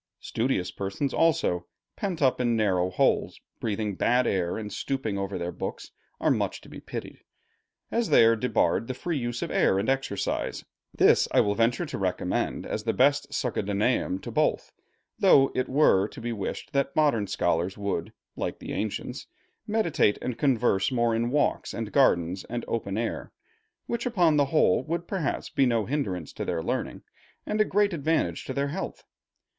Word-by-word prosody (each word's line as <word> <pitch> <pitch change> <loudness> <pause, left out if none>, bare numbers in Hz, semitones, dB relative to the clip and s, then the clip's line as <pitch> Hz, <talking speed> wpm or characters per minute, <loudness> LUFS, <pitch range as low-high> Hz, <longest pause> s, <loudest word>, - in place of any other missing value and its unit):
Studious 110 -7 -1
persons 100 +8 -3
also, 155 - +1 0.3
pent 180 -6 -2
up 130 -1 +3
in 120 -1 +2
narrow 95 -5 +1
holes, 90 - +1 0.2
breathing 105 -1 -2
bad 125 +6 +2
air, 90 -5 0
and 105 -1 -6
stooping 120 -7 -2
over 100 0 -3
their 85 0 -3
books, - - -6 0.3
are - - +2
much - - -1
to - - -15
be - - -9
pitied. - - -7 0.7
As 235 -1 0
they 115 - +7
are 115 0 +5
debarred 115 0 +1
the 130 - -4
free 165 +2 -2
use 120 -1 -3
of - - -4
air 95 - +3
and 100 +5 0
exercise, 135 -7 -2 0.3
this - - +4
I - - +5
will 100 - +1
venture 115 +3 +1
to - - -5
recommend - - -1
as 105 - -3
the 115 0 0
best 145 +2 +2
succedaneum 105 -3 0
to - - -6
both; - - 0 0.5
though 135 -1 +6
it 130 - -1
were 130 -8 +4
to - - -11
be 120 0 -3
wished 100 -4 -5
that 140 0 0
modern 140 -10 +2
scholars 85 +2 0
would, 100 -4 -3 0.2
like - - -3
the - - -7
ancients, 105 -1 -4 0.4
meditate 205 - +2
and 125 - -3
converse 120 -7 +2
more 120 -2 +2
in 115 +1 0
walks 145 +3 0
and 110 -2 -4
gardens 90 - +2
and 120 0 -4
open 105 -3 -2
air, 115 0 -3 0.5
which 235 +1 -2
upon 175 -10 +3
the 145 - +4
whole 155 +3 +3
would 170 +2 -3
perhaps 185 -8 -2
be 135 - +3
no 115 -3 +1
hindrance 95 - -3
to - - -4
their 80 - -2
learning, - - -3 0.4
and 215 0 0
a - - +7
great 205 0 +2
advantage 150 - 0
to 130 - -4
their 140 0 0
health. 190 +6 -5
120 Hz, 175 wpm, -27 LUFS, 100-140 Hz, 0.7 s, they